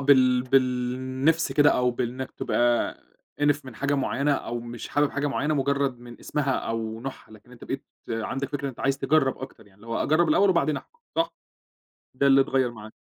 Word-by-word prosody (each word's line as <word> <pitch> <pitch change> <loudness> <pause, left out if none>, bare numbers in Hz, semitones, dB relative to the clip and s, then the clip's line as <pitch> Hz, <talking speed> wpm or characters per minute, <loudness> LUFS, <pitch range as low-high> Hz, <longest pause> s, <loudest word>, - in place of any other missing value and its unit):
بال 130 -3 +5
بالنِفْس 130 +4 +1
كده 145 +1 +5
أو 125 0 +2
بإنك 125 +2 -3
تبقى 120 0 +1 0.5
إنِف 145 0 +2
من 130 -3 -10
حاجة 140 +4 0
معيّنة 140 +1 +1
أو 120 -3 -3
مش 120 0 -7
حابب 145 0 +2
حاجة 145 0 -1
معيّنة 145 +2 0
مجرد 140 -2 0
من 120 0 -12
اسمها 145 -2 -1
أو 115 -2 -3
نوعها، 130 -3 -8
لكن 110 +3 -16
أنت 120 - -12
بقيت 135 +1 -4 0.3
عندك 115 +5 -2
فكرة 140 -1 -3
أنت 130 - -9
عايز 135 0 +1
تجرّب 135 -1 +2
أكتر 130 -5 -10
يعني 100 0 -23
لو 115 - -14
هو 115 - -1
أجرب 160 +3 +3
الأول 195 +6 +4
وبعدين 155 -4 +2
أحكم 475 - -11 0.2
صح؟ 330 0 +1 0.8
ده 140 +2 +2
اللي 135 0 +6
اتغيّر 135 -2 +2
معاك. 110 -2 -11
135 Hz, 190 wpm, -26 LUFS, 120-145 Hz, 0.8 s, اللي